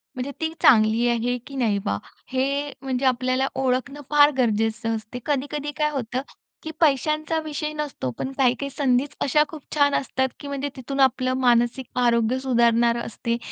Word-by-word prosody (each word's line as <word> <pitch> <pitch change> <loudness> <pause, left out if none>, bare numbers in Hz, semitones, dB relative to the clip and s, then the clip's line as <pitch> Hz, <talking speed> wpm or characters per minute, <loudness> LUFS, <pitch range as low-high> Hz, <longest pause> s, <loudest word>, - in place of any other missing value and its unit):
म्हणजे 255 +2 -4
ती 320 0 0
चांगली 225 0 +5
आहे 240 +1 0
की 275 - -9
नाही 230 -6 +1
बा, 100 - -2 0.3
हे 275 +2 -1
म्हणजे 265 -1 -2
आपल्याला 255 +1 +1
ओळखणं 265 +2 -1
फार 295 0 +6
गरजेचं 225 -1 0
असते. 220 +3 -7
कधी-कधी 290 +1 -2
काय 300 -1 +2
होतं 255 -2 -3 0.4
की 315 - -5
पैशांचा 305 +2 +2
विषय 305 0 -3
नसतो 295 - -4
पण 265 - -3
काही-काही 260 +1 +1
संधीच 270 0 0
अशा 300 +2 +3
खूप 315 -3 -9
छान 285 -1 +3
असतात 265 -1 0
की 285 - -8
म्हणजे 280 0 -3
तिथून 275 +1 -5
आपलं 255 -1 +3
मानसिक 240 +1 +2
आरोग्य 235 +1 +2
सुधारणार 235 -2 +3
असते, 235 0 -3
260 Hz, 160 wpm, -23 LUFS, 235-285 Hz, 0.4 s, फार